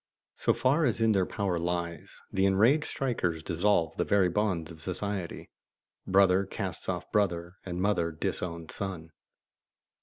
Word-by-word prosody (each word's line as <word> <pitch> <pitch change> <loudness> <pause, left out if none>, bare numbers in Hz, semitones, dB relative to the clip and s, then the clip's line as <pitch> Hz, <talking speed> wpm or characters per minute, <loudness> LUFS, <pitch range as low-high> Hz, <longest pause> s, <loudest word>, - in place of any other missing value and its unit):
So - - +2
far 145 +5 +2
as 115 -4 +1
in 115 -1 +4
their 95 -3 +2
power 95 -5 -1
lies, 85 0 -4
the 95 0 +3
enraged 115 +11 +4
strikers 100 - -1
dissolve 85 -1 +1
the - - +2
very 100 -3 +3
bonds 90 -4 -1
of 80 -1 -12
society, 95 0 -4 0.6
brother 95 0 +5
casts - - -4
off - - -3
brother, 90 -3 0
and 90 -1 -3
mother 90 -4 +1
disowns 85 +1 -4
son. 90 -5 -5
95 Hz, 145 wpm, -29 LUFS, 85-105 Hz, 0.6 s, brother